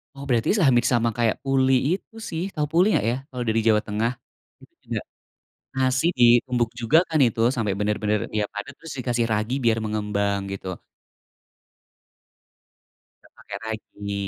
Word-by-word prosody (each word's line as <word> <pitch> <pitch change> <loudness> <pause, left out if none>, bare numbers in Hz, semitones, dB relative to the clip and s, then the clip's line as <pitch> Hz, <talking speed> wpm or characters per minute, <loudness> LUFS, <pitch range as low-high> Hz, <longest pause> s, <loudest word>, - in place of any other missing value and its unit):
Oh 140 - -8
berarti 120 -3 +2
se 195 - +2
hampir 120 -3 +4
sama 120 -2 +2
kayak 115 -2 +2
pulih 135 -1 +3
itu 195 +4 -4
sih, 165 +1 -3
tahu 150 -2 0
pulih 175 +4 +4
nggak - - +1
ya, - - -1
kalau 125 -1 -4
dari 115 +1 +2
Jawa 105 -1 +4
Tengah. 110 +3 0 0.5
Itu - - -19
juga, - - -2 0.8
nasi 130 +2 +1
ditumbuk 120 0 +4
juga 120 +8 +4
kan 160 - 0
itu, 115 -1 -2
sampai 110 -5 -1
benar-benar 105 0 0 0.2
dia 105 - +1
padat 105 0 -7
terus 165 -1 -9
dikasih 120 -2 0
ragi 110 +3 -1
biar 115 -1 +3
mengembang, 105 -1 -1
gitu. 95 -1 -6 2.6
Enggak - - -23
pake 100 - -9
ragi. 105 -2 -6
115 Hz, 155 wpm, -24 LUFS, 105-130 Hz, 2.6 s, hampir